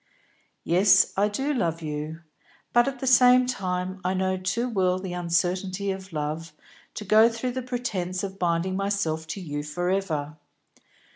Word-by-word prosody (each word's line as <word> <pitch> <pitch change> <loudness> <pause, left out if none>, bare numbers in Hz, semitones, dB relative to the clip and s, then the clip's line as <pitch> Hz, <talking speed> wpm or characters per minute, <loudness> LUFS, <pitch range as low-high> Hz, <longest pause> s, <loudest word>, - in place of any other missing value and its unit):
"Yes, 190 +3 +4
I 200 +2 +3
do 270 +8 -1
love 165 - -1
you; 155 +2 -5 0.5
but 240 +1 +5
at 275 -1 -3
the 265 - -5
same 250 0 +6
time 185 -5 -3
I 185 +1 0
know 190 0 0
too 185 +6 -1
well 185 -6 +1
the 185 -1 -5
uncertainty 185 +3 -1
of 190 0 -7
love 155 +1 -4 0.4
to 210 - -6
go 220 +3 +6
through 235 +2 -3
the 255 +1 -3
pretence 210 -7 -3
of 195 0 -6
binding 175 +1 0
myself 195 -5 -1
to 160 +5 -5
you 145 -5 -4
for 175 +5 -2
ever. 155 -6 -2
185 Hz, 160 wpm, -25 LUFS, 170-210 Hz, 0.5 s, same